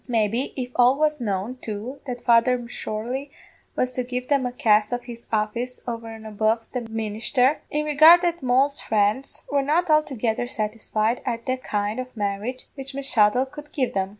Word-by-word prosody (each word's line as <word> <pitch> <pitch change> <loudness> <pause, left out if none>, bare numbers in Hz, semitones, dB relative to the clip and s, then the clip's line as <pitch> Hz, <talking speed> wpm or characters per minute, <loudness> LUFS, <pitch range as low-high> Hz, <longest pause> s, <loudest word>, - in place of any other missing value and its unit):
Maybe, 230 +2 0
if 250 -1 -4
all 250 +1 +6
was 300 -2 +1
known, 205 +3 -2
too, 225 +6 -6
that 245 -1 -6
Father 240 +2 +5
M'Sorley 245 +2 -5 0.5
was 255 - 0
to 250 0 -2
give 250 0 -4
them 275 -3 +2
a - - -4
cast 215 -3 +3
of 245 0 -2
his 235 -1 -10
office 230 +3 -1
over 230 -1 -4
an' 225 -1 -9
above 220 +1 0
the 250 - -2
ministher, 225 +5 +1
in 300 0 -1
regard 310 +4 +7
that 345 -1 0
Moll's 265 +3 +2
friends 215 +5 0
were 285 -1 +3
not 315 +5 +1
altogether 245 -6 +1
satisfied 215 0 -1
at 235 -2 -3
the 255 - 0
kind 210 -2 -2
of 255 -1 -7
marriage 210 +5 -3
which 270 -1 -7
M'Shuttle 250 -3 +3
could 295 +2 -12
give 260 -4 0
them. 190 -1 0
245 Hz, 180 wpm, -24 LUFS, 220-265 Hz, 0.5 s, regard